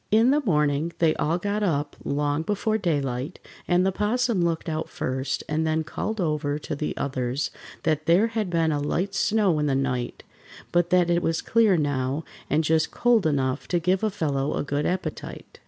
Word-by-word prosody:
In 225 Hz, +4 st, +5 dB
the 295 Hz, +2 st, +3 dB
morning 150 Hz, -, +1 dB
they 160 Hz, -2 st, +3 dB
all 165 Hz, +3 st, +1 dB
got 205 Hz, +3 st, -2 dB
up 145 Hz, -7 st, 0 dB
long 145 Hz, +1 st, 0 dB
before 210 Hz, +5 st, 0 dB
daylight, 140 Hz, -, -1 dB, 0.3 s
and 180 Hz, +1 st, +3 dB
the 195 Hz, -, +2 dB
'Possum 220 Hz, +1 st, +1 dB
looked 165 Hz, -1 st, -1 dB
out 160 Hz, 0 st, -2 dB
first 135 Hz, -5 st, -2 dB
and 155 Hz, +1 st, 0 dB
then 160 Hz, 0 st, +1 dB
called 220 Hz, +7 st, -4 dB
over 150 Hz, -4 st, 0 dB
to 150 Hz, -, -5 dB
the 150 Hz, +1 st, -3 dB
others 130 Hz, 0 st, -2 dB, 0.3 s
that 155 Hz, -1 st, 0 dB
there 175 Hz, +6 st, +5 dB
had 220 Hz, -4 st, -2 dB
been 165 Hz, -2 st, +1 dB
a 145 Hz, -, 0 dB
light 180 Hz, +7 st, -1 dB
snow 195 Hz, -5 st, +2 dB
in 150 Hz, -, +1 dB
the 135 Hz, -, +1 dB
night, 125 Hz, -3 st, -2 dB, 0.5 s
but 175 Hz, 0 st, +2 dB
that 180 Hz, -2 st, +3 dB
it 170 Hz, 0 st, +2 dB
was 165 Hz, -1 st, -1 dB
clear 220 Hz, -5 st, +4 dB
now 145 Hz, 0 st, -1 dB, 0.3 s
and 155 Hz, +2 st, +2 dB
just 160 Hz, +1 st, +2 dB
cold 235 Hz, -7 st, +3 dB
enough 135 Hz, -2 st, 0 dB
to 175 Hz, -, +1 dB
give 185 Hz, +4 st, +1 dB
a 215 Hz, -, +3 dB
fellow 145 Hz, -7 st, -1 dB
a -, -, -1 dB
good 145 Hz, +1 st, -1 dB
appetite. 185 Hz, +1 st, -5 dB
160 Hz, 190 wpm, -25 LUFS, 145-190 Hz, 0.5 s, In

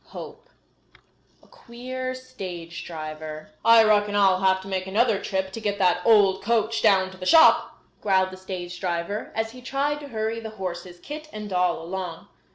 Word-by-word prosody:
CHAPTER -, -, -8 dB
V -, -, -31 dB, 0.4 s
A -, -, -22 dB
QUEER 255 Hz, +2 st, -6 dB
STAGE 180 Hz, -9 st, -8 dB
DRIVER 155 Hz, -1 st, -7 dB
"I 230 Hz, 0 st, +7 dB
reckon 205 Hz, -1 st, +3 dB
I'll 195 Hz, -2 st, +4 dB
have 190 Hz, 0 st, +3 dB
to 190 Hz, -, -11 dB
make 190 Hz, -1 st, -3 dB
another 215 Hz, +1 st, +2 dB
trip 190 Hz, -1 st, -2 dB
to 225 Hz, -, -6 dB
get 205 Hz, -2 st, -2 dB
that 180 Hz, -2 st, +2 dB
old 205 Hz, -4 st, +4 dB
coach 225 Hz, 0 st, 0 dB
down 190 Hz, -3 st, +3 dB
to 190 Hz, -, -13 dB
the 185 Hz, -, -7 dB
shop," 320 Hz, -1 st, +6 dB, 0.2 s
growled 190 Hz, -2 st, +2 dB
the 185 Hz, -, -9 dB
stage 180 Hz, -2 st, -7 dB
driver, 180 Hz, +3 st, -3 dB
as 225 Hz, 0 st, -1 dB
he 250 Hz, +1 st, -12 dB
tried 280 Hz, +3 st, -1 dB
to 290 Hz, -, -9 dB
hurry 220 Hz, -2 st, -3 dB
the 225 Hz, -1 st, -7 dB
horses, 175 Hz, -1 st, -6 dB
Kit 305 Hz, -, -8 dB
and 210 Hz, -1 st, -7 dB
Doll, 180 Hz, -2 st, +1 dB
along. 180 Hz, -1 st, -6 dB
195 Hz, 180 wpm, -25 LUFS, 185-230 Hz, 0.4 s, I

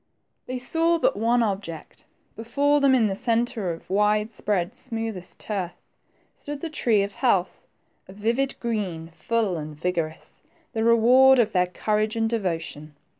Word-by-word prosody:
They 255 Hz, -, -3 dB
saw 330 Hz, +6 st, +1 dB
but -, -, +1 dB
one 230 Hz, +3 st, +2 dB
object. 195 Hz, -6 st, -5 dB, 0.3 s
Before 285 Hz, +6 st, +1 dB
them, 275 Hz, -1 st, +5 dB
in 235 Hz, -3 st, +3 dB
the 195 Hz, -2 st, 0 dB
centre 230 Hz, -3 st, -1 dB
of 165 Hz, -, -9 dB
wide 210 Hz, +3 st, +1 dB
spread, 190 Hz, -5 st, -2 dB
smoothest 225 Hz, -7 st, -6 dB
turf, 190 Hz, -5 st, -4 dB, 0.6 s
stood 290 Hz, -1 st, -8 dB
'the 330 Hz, -, -5 dB
tree 225 Hz, -9 st, +2 dB
of 200 Hz, 0 st, -5 dB
hqalth, 190 Hz, -9 st, 0 dB, 0.4 s
of 190 Hz, -, -12 dB
vivid 235 Hz, +6 st, -1 dB
green, 190 Hz, -9 st, -3 dB
full 200 Hz, +3 st, -1 dB
and 150 Hz, -1 st, -6 dB
vigorous, 165 Hz, -1 st, -4 dB, 0.3 s
the 220 Hz, -, -1 dB
re 230 Hz, 0 st, +5 dB
ward 260 Hz, +4 st, +6 dB
of 225 Hz, -3 st, +3 dB
their 180 Hz, -2 st, +2 dB
courage 215 Hz, +4 st, -1 dB
and 225 Hz, 0 st, +1 dB
devotion. 165 Hz, -8 st, -3 dB
215 Hz, 155 wpm, -24 LUFS, 180-240 Hz, 0.6 s, ward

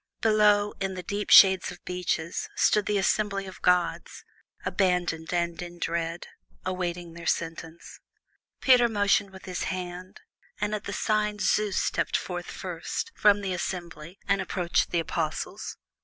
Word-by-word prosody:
Below, 210 Hz, -2 st, +4 dB
in 195 Hz, -1 st, -2 dB
the 180 Hz, -, -6 dB
deep 205 Hz, +3 st, -3 dB
shade 190 Hz, -2 st, +9 dB
of 175 Hz, -, -13 dB
beeches, 180 Hz, -2 st, -2 dB
stood 210 Hz, -1 st, +3 dB
the 210 Hz, -, +1 dB
assembly 200 Hz, 0 st, 0 dB
of 190 Hz, -, -11 dB
gods, 180 Hz, -1 st, +1 dB, 0.4 s
abandoned 175 Hz, -4 st, 0 dB
and 170 Hz, -1 st, -1 dB
in 175 Hz, 0 st, -8 dB
dread, 170 Hz, 0 st, -2 dB, 0.4 s
awaiting 175 Hz, -2 st, -3 dB
their 170 Hz, 0 st, -8 dB
sentence. 165 Hz, 0 st, -4 dB, 0.6 s
Peter 245 Hz, -2 st, +5 dB
motioned 205 Hz, -2 st, +2 dB
with 190 Hz, -1 st, -13 dB
his 185 Hz, -1 st, -3 dB
hand, 185 Hz, 0 st, -6 dB, 0.4 s
and 210 Hz, +1 st, -1 dB
at 210 Hz, -1 st, -3 dB
the -, -, -4 dB
sign 210 Hz, +1 st, 0 dB
Zeus 210 Hz, 0 st, +1 dB
stepped -, -, 0 dB
forth -, -, -5 dB
first 460 Hz, -, -5 dB
from 205 Hz, -, +4 dB
the 190 Hz, -2 st, -2 dB
assembly 175 Hz, -1 st, -5 dB
and 195 Hz, 0 st, +2 dB
approached 175 Hz, -3 st, 0 dB
the 170 Hz, -, 0 dB
Apostles. 160 Hz, -1 st, -3 dB
185 Hz, 145 wpm, -27 LUFS, 175-205 Hz, 0.6 s, shade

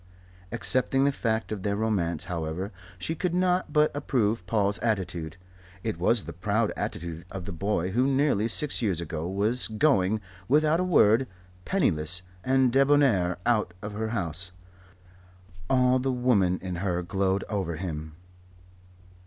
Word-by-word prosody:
Accepting 135 Hz, +1 st, +1 dB
the 140 Hz, -, +3 dB
fact 110 Hz, -5 st, -1 dB
of 105 Hz, -3 st, -3 dB
their 100 Hz, +1 st, -1 dB
romance, 95 Hz, -7 st, 0 dB
however, 90 Hz, +2 st, -4 dB, 0.3 s
she 125 Hz, -, -3 dB
could 175 Hz, +1 st, -2 dB
not 180 Hz, 0 st, +1 dB
but 150 Hz, -1 st, +3 dB
approve 115 Hz, -9 st, 0 dB
Paul's 100 Hz, 0 st, +1 dB
attitude. 90 Hz, -7 st, -2 dB, 0.5 s
It 110 Hz, -7 st, -3 dB
was 110 Hz, +5 st, +3 dB
the -, -, -7 dB
proud 105 Hz, +5 st, 0 dB
attitude 85 Hz, 0 st, -4 dB
of 95 Hz, -2 st, -6 dB
the 100 Hz, -, -5 dB
boy 95 Hz, 0 st, -1 dB
who 125 Hz, +6 st, +2 dB
nearly 135 Hz, -6 st, +2 dB
six 140 Hz, +5 st, 0 dB
years 95 Hz, -7 st, 0 dB
ago 80 Hz, -1 st, -4 dB
was 105 Hz, +6 st, +1 dB
going, 110 Hz, -4 st, +2 dB, 0.3 s
without 155 Hz, +3 st, +3 dB
a -, -, +2 dB
word, 130 Hz, -, +4 dB, 0.4 s
penniless 90 Hz, -, 0 dB, 0.2 s
and 130 Hz, 0 st, +3 dB
debonair 135 Hz, -11 st, +3 dB
out 105 Hz, -7 st, +1 dB
of 105 Hz, 0 st, -5 dB
her 110 Hz, +1 st, -2 dB
house. 90 Hz, -4 st, -2 dB, 1.2 s
All 125 Hz, 0 st, +4 dB
the 135 Hz, +1 st, 0 dB
woman 115 Hz, -8 st, +2 dB
in 90 Hz, -2 st, -4 dB
her 90 Hz, -1 st, -1 dB
glowed 95 Hz, +1 st, 0 dB
over 95 Hz, -6 st, -2 dB
him. 80 Hz, -3 st, -5 dB
105 Hz, 145 wpm, -27 LUFS, 90-130 Hz, 1.2 s, word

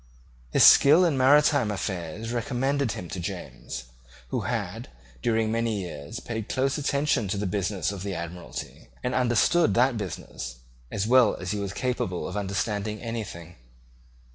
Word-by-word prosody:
His -, -, +4 dB
skill 155 Hz, +6 st, +8 dB
in 165 Hz, -5 st, +2 dB
maritime 140 Hz, -2 st, +4 dB
affairs 95 Hz, +1 st, -4 dB
recommended 130 Hz, +2 st, 0 dB
him 90 Hz, -6 st, -6 dB
to 90 Hz, -, -5 dB
James, 80 Hz, -6 st, -6 dB, 0.5 s
who -, -, -1 dB
had, -, -, -3 dB, 0.3 s
during 110 Hz, -1 st, +1 dB
many 115 Hz, -2 st, 0 dB
years, 90 Hz, -, -6 dB
paid 110 Hz, -3 st, -5 dB
close 135 Hz, +3 st, 0 dB
attention 140 Hz, -5 st, +1 dB
to 100 Hz, +2 st, -2 dB
the 105 Hz, -, -2 dB
business 95 Hz, +1 st, -1 dB
of 100 Hz, -2 st, -6 dB
the 100 Hz, -1 st, -3 dB
Admiralty, 85 Hz, -7 st, -7 dB
and 125 Hz, -, -1 dB
understood 130 Hz, +7 st, +3 dB
that 125 Hz, 0 st, +3 dB
business 90 Hz, -, -6 dB, 0.3 s
as 100 Hz, -, -2 dB
well 125 Hz, -1 st, +5 dB
as 90 Hz, 0 st, -5 dB
he 105 Hz, -, -2 dB
was 100 Hz, -1 st, -3 dB
capable 100 Hz, -7 st, -2 dB
of 95 Hz, -, -6 dB
understanding 105 Hz, +1 st, -2 dB
anything. 100 Hz, -8 st, -6 dB
110 Hz, 150 wpm, -26 LUFS, 95-125 Hz, 0.5 s, skill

